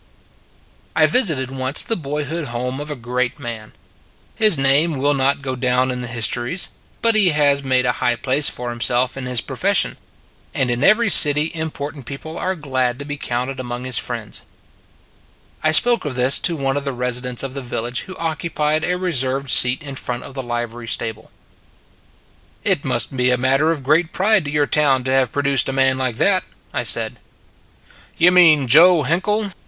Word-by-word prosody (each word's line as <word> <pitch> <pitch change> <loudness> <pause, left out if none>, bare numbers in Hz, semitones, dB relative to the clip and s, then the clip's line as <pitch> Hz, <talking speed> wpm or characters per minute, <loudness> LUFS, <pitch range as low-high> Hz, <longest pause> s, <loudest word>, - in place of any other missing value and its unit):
I - - +4
VISITED 155 - +1
once 130 +1 0
the 225 - -1
boyhood 150 0 -5
home 125 +2 -4
of 145 +1 -7
a 150 - -5
great 125 0 -3
man. 110 -2 -8 0.6
His 215 -7 +3
name 140 +4 +4
will 145 +2 +1
not 140 0 0
go 130 -1 -4
down 125 0 0
in 125 0 -5
the 125 - -5
his 115 -1 +1
tories, 125 +10 -2 0.3
but 230 0 +4
he 210 -4 +4
has 145 -2 +1
made 130 -1 +1
a 125 - +2
high 120 -1 +1
place 130 +4 0
for 120 0 -6
himself 120 +2 -1
in 135 -2 -6
his 125 -3 +2
profession; - - -1 0.6
and 125 -2 0
in 120 +2 -2
every 215 +2 +3
city 150 0 +6
important 150 -4 -6
people 150 +4 -8
are 190 +1 -3
glad 130 -6 -2
to 140 - -8
be 145 0 -5
counted 130 0 -4
among 120 -1 -6
his 130 -2 +2
friends. 115 -4 -6 1.2
I 155 - +1
spoke 235 +9 +5
of 145 -4 -5
this 125 +2 +4
to 170 - -3
one 135 -2 -2
of 145 - -4
the 140 -1 -4
residents 125 0 -2
of 135 -1 -5
the 140 - -6
village 120 -1 -4
who 185 - -8
occupied 155 -1 -2
a 180 +1 -1
reserved 135 -7 -1
seat 125 +4 +5
in 140 -2 -8
front 125 -2 -5
of 140 - -11
the 135 - -5
livery 120 -1 -6
stable. 110 0 -4 0.7
" - - -35
It - - 0
must - - -1
be 125 0 +1
a 125 - +2
matter 135 +5 +1
of 155 -5 -2
great 160 +5 +1
pride 200 -2 +1
to - - -4
your 150 -1 +1
town 140 -4 +1
to 130 - -3
have 130 -3 +1
produced 140 -2 +1
a - - -1
man 135 0 +2
like 130 -3 -1
that," 185 - +1 0.3
I - - -1
said. - - +3 0.5
" - - -28
You 175 +1 +4
mean 165 -6 +5
Joe 165 +5 +6
Hinkle? 200 +8 -1
135 Hz, 190 wpm, -19 LUFS, 125-155 Hz, 1.2 s, city